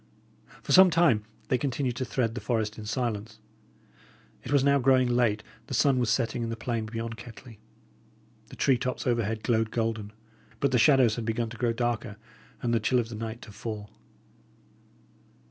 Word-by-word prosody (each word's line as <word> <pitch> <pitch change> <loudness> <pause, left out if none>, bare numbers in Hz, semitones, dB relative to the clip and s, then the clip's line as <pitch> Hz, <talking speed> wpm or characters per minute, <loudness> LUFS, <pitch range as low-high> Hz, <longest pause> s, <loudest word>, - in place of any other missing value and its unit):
For - - -4
some 190 0 +8
time 155 -11 +3 0.2
they 125 - +2
continued 130 -1 -1
to 130 - -2
thread 115 -2 -1
the 125 - -5
forest 110 -3 -2
in 105 - -7
silence. 110 -2 -3 1.1
It 125 - -7
was 140 -2 +4
now 140 0 +4
growing 130 0 +4
late; 120 -4 +1 0.2
the - - -3
sun 135 -3 +3
was 120 -3 +1
setting 120 0 0
in 115 - -2
the 115 - -3
plain 115 -1 -3
beyond 115 +1 -5
Kettley; 120 -1 -12 0.9
the - - -12
tree 130 -3 +2
tops 125 0 -3
overhead 115 -3 0
glowed 115 -2 +1
golden; 110 -3 -2 0.5
but 140 - +1
the 125 - +3
shadows 130 -4 +5
had 115 - -3
begun 115 0 -1
to 120 - -9
grow 120 -2 +1
darker 115 -2 -2 0.5
and 120 -1 +1
the 115 - +3
chill 125 +4 +1
of 115 -2 0
the 115 - -7
night 115 +2 -6
to - - -11
fall. 105 -1 -6
115 Hz, 180 wpm, -27 LUFS, 110-125 Hz, 1.1 s, some